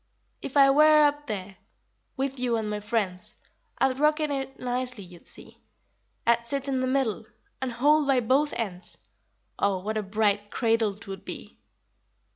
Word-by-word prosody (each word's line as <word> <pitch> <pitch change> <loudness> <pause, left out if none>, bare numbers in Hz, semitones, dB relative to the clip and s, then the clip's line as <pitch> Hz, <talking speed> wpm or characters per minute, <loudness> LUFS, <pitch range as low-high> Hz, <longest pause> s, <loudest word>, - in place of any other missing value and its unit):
If 275 - -4
I 275 -1 +7
were 305 +1 +6
up 290 0 0
there, 195 -3 -5 0.6
With 270 0 -2
you 245 -2 +1
and 220 -1 -2
my 210 0 -2
friends, 205 -4 -3 0.4
I'd 265 0 +1
rock 300 +1 +3
in 305 -1 -1
it 270 -1 -4
nicely, 250 -3 -3
you'd 175 -2 -14
see; - - -10 0.7
I'd 235 0 +2
sit 275 +2 -1
in 265 -2 0
the 255 - 0
middle 255 -5 0 0.3
And 260 -1 -2
hold 290 +5 +3
by 270 -2 +4
both 270 +5 +2
ends; 185 -6 -5 0.6
Oh, 200 -1 +2
what 215 +4 -3
a - - 0
bright 205 0 0
cradle 225 -3 +1
'twould 195 -3 -9
be! - - -9
245 Hz, 165 wpm, -27 LUFS, 210-275 Hz, 0.7 s, I